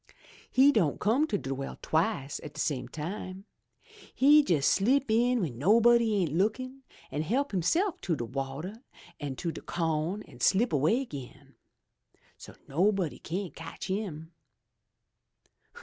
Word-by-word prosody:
He 270 +2 +6
don' 180 - +1
come 255 +9 +2
to 210 - 0
de 135 -6 -4
well 135 0 -6
twice 160 -4 -1
at 150 - -10
de - - -8
same 140 -5 -1
time. 185 +4 -6 0.7
He 290 +3 +7
jes' 155 - +1
slip 250 +5 +3
in 245 +3 +3
w'en 150 - -3
nobody 230 - +4
ain't 175 -7 0
lookin' 255 +9 -1 0.3
an' 150 - -2
help 260 - 0
hisself 340 - 0
to 170 - 0
de 120 - -4
wateh 135 - -5 0.4
an' 145 -3 -4
de 165 +4 -4
co'n, 165 +4 -2
an' - - -16
slip 220 +3 +3
away 155 - +3
again. 140 - -9 0.8
So - - -13
nobody 185 +2 +1
cyan't 180 +2 -4
cotch 165 +3 -8
him. 175 -5 -4
185 Hz, 140 wpm, -29 LUFS, 150-230 Hz, 0.8 s, He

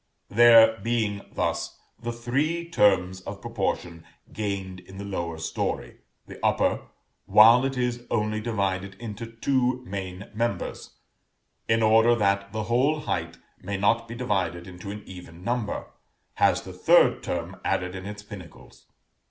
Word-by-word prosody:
There 115 -1 +7
being 110 -2 -1
thus - - -2 0.2
the 120 0 -3
three 140 +9 -1
terms 95 - +2
of - - -7
proportion 85 -1 -3 0.3
gained 100 -3 -4
in 95 +1 -14
the 100 - -6
lower 85 -4 -4
story, 80 - -3 0.3
the - - -12
upper, - - +1 0.4
while 115 +4 +7
it 135 -1 -2
is 120 -1 -1
only 110 -1 0
divided 100 -4 -2
into 115 +1 -7
two 125 +1 0
main 95 -1 -6
members, 115 +2 -3 0.7
in 115 0 +3
order 115 +2 +5
that 100 -2 +1
the 110 +1 -3
whole 130 +7 +1
height 85 - -3 0.2
may 100 +2 -3
not 115 +4 +2
be 120 - -7
divided 95 -8 -1
into 95 +1 -9
an 105 +1 -7
even 90 -2 -11
number, 120 -1 -2 0.4
has - - +2
the - - -9
third - - +4
term - - -4
added 90 0 -1
in 95 +1 -7
its 105 0 -8
pinnacles. 100 -5 -13
105 Hz, 145 wpm, -26 LUFS, 95-120 Hz, 0.7 s, There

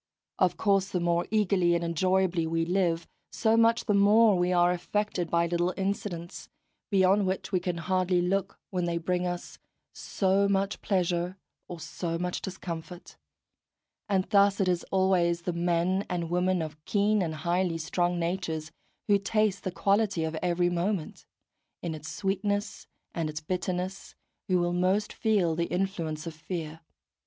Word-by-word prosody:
Of - - +2
course 195 -2 +2
the 180 - -1
more 170 0 +1
eagerly 190 -5 +2
and 170 - -1
enjoyably 175 0 +1
we 165 0 0
live, 175 -2 0 0.2
so 220 -1 +2
much 230 +1 +3
the 210 - +2
more 205 +2 +5
we 180 0 +1
are 175 0 +4
affected 180 0 -2
by 170 +1 +2
little 175 +1 0
incidents, 190 -3 -4 0.4
beyond 195 0 +3
which 190 +1 -3
we 185 - +2
can 175 -1 -3
hardly 185 +1 +1
look 190 +2 -1
when 180 -2 -1
they 170 -1 -1
bring 180 +1 -1
us 175 0 -6 0.3
so 195 0 +1
much 195 0 0
pleasure 180 -1 0 0.3
or 175 - -7
so 165 +1 -4
much 180 +1 -3
discomfort; 175 -2 -7 0.9
and 190 -2 +2
thus 200 -1 +4
it 195 - +2
is 180 -1 +1
always 180 -3 +2
the 180 - -2
men 175 +3 +1
and 170 -2 -3
women 180 0 +1
of 155 -1 -8
keen 210 0 +2
and 160 -3 -2
highly 175 +1 0
strung 175 +2 0
natures, 165 -3 -2 0.4
who 205 -1 +4
taste 205 -1 0
the - - -1
quality 200 -2 +1
of 160 0 -2
every 175 0 +1
moment, 175 0 -2 0.6
in 170 -2 -2
its 155 0 -7
sweetness 205 +1 -2 0.3
and 165 -2 -2
its 155 0 -4
bitterness, 180 +3 -4 0.3
who 185 - +3
will 175 0 0
most 185 +4 +1
feel 195 -7 +1
the 170 +1 0
influence 175 -4 -2
of 165 - -5
fear. 160 0 -6
180 Hz, 160 wpm, -28 LUFS, 170-195 Hz, 0.9 s, more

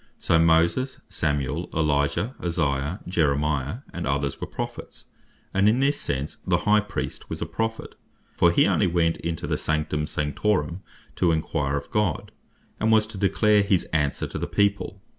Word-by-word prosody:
So 85 - +2
Moses, 85 +11 +3
Samuel, 75 +1 -1
Elijah, 75 - +1
Isaiah, 80 -1 -1
Jeremiah, 75 - 0
and 85 -5 -4
others 70 0 -1
were - - -3
Prophets. - - -7 0.5
And 95 +2 +4
in 115 +4 +2
this 140 +2 +1
sense 70 +1 -3
the - - 0
High 105 0 +5
Priest 105 -1 -5
was - - -4
a - - -2
Prophet, 115 0 -3 0.4
for 85 - +4
he - - +4
only - - +2
went 85 -1 +1
into 85 0 -4
the - - -1
Sanctum 75 -1 -1
Sanctorum, 75 +3 -1 0.4
to 85 - +3
enquire 70 -3 -1
of 70 - -7
God; 105 - 0 0.5
and 110 - +2
was 110 -1 +5
to 110 -3 -9
declare 105 +1 +3
his 100 -3 +2
answer 75 -3 0
to - - -5
the - - -2
people. 100 -1 0
85 Hz, 160 wpm, -25 LUFS, 75-105 Hz, 0.5 s, High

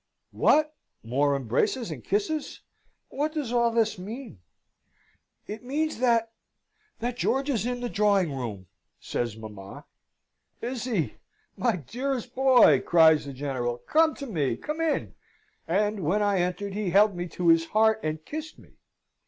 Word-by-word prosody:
"What! 305 0 +3 0.3
more 140 +5 +1
embraces 140 - -1
and 135 -7 -7
kisses! 280 +10 -2 0.5
What 300 +2 -2
does 285 -7 -3
all 235 -1 +3
this 225 -3 0
mean?" 220 - -8 1.1
"It 215 +3 -7
means 300 +2 -2
that 230 -2 +2 0.7
that 240 +1 -2
George 270 +3 0
is 235 -3 -1
in 245 0 -3
the 245 - -2
drawing 200 -7 +2
room," 110 -7 -5 0.3
says 115 -3 -3
mamma. 105 -3 -10 0.7
"Is 245 0 -4
he! 180 - -1 0.4
My - - +1
dearest 250 - -4
boy!" 255 - +6
cries 160 -3 +5
the 140 - -6
General. 130 -3 -3
"Come 315 - +2
to 280 - -7
me 160 - -1
come 305 +2 -4
in!" 325 -2 -1 0.5
And 205 +4 +1
when 190 +5 +1
I 200 -2 +2
entered 180 +3 -2
he 205 -2 -2
held 200 +2 +4
me 175 0 -4
to 175 0 0
his 165 0 +5
heart, 220 +2 +3
and 155 0 -4
kissed 315 +1 -6
me. - - -20
210 Hz, 150 wpm, -27 LUFS, 155-250 Hz, 1.1 s, boy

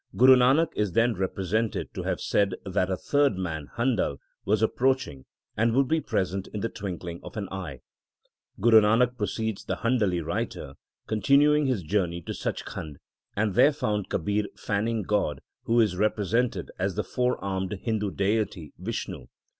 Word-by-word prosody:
Guru 130 +1 +8
Nanak 135 +6 +4
is 105 -4 0
then 115 +3 +3
represented 95 +3 -2
to - - -4
have - - -2
said 100 -1 +1
that 95 -1 0
a 95 - -1
third 145 -4 +2
man, 80 -6 -4
Handal, 115 - +1 0.3
was 105 +2 +2
approaching, 125 - 0 0.3
and 115 +2 +2
would 135 0 +3
be 160 +2 +1
present 95 -4 -2
in 105 - -6
the 115 - -1
twinkling 90 -5 -6
of - - -10
an 100 -2 -3
eye. 85 -9 -6 0.8
Guru 110 +1 +7
Nanak, 115 +4 +3
proceeds 110 -1 -3
the - - -2
Handali 110 -7 +1
writer, 65 - -3 0.3
continued 145 +6 +3
his 120 -9 0
journey 85 0 0
to - - -5
Sach - - -4
Khand, 75 -2 -7 0.4
and 105 -1 0
there 130 +7 +6
found 105 -8 -2
Kabir 105 +5 0
fanning 110 +2 -1
God, 95 -8 0 0.3
who 115 +1 +3
is 105 -5 +3
represented 110 +4 0
as - - -1
the - - -1
four 125 0 0
armed 95 0 -3
Hindu 110 -3 0
deity 100 -5 -1
Vishnu. 110 +5 -5
105 Hz, 160 wpm, -27 LUFS, 95-120 Hz, 0.8 s, Guru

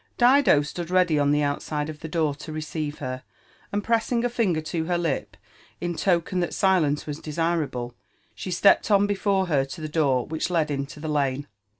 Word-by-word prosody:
Dido 245 - +5
stood 170 +3 -6
ready 180 -4 +3
on 145 0 +2
the 150 0 +2
outside 150 +1 -2
of 155 -1 -7
the 160 - -6
door 160 -3 0
to 150 +2 -9
receive 155 -1 -4
hev; 130 -2 -5 0.5
and 205 0 -1
pressi^ 230 +1 +1
a - - +1
&Dger 205 -10 0
to 160 0 -2
her 175 +1 0
lip 165 -5 -2 0.4
in 175 0 -2
token 180 +1 +1
that 175 - -2
silence 175 -7 +2
ws# 150 0 -6
desirable, 155 -6 -2 0.4
she - - -7
stepped 185 +4 +4
on 200 -1 +5
before 200 -1 +1
her 145 -6 +2
to 135 - -9
the 155 - -4
door 140 -5 +1
which 160 +2 -3
led 160 -4 +1
into 140 +1 -4
the 155 - -5
lane. 140 -2 0
160 Hz, 195 wpm, -25 LUFS, 145-185 Hz, 0.5 s, Dido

